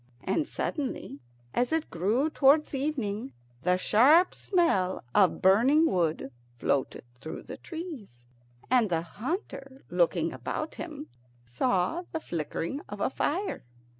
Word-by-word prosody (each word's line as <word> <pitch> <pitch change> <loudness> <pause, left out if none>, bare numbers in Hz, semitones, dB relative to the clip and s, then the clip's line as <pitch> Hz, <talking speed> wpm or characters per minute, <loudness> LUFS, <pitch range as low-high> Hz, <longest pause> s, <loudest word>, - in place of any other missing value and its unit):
And 200 +11 0
suddenly, 260 - -4 0.3
as 245 +3 +1
it 320 -1 -1
grew 220 - +1
towards 300 +2 +4
evening, 240 - -2 0.3
the 180 +3 +2
sharp 275 - +5
smell 330 - +1
of 190 -3 +3
burning 245 - +5
wood 165 - 0 0.3
floated 135 +3 -1 0.2
through 155 - -7
the - - -8
trees, 285 - -8 0.5
and 245 -5 +4
the 165 -2 0
hunter, 270 - -6
looking 170 -1 +1
about 130 - -4
him, 310 -2 -7 0.4
saw 185 - 0
the 320 - -1
flickering 170 - -4
of 205 0 -7
a 260 - 0
fire. 375 +10 -2
235 Hz, 125 wpm, -28 LUFS, -, 0.5 s, sharp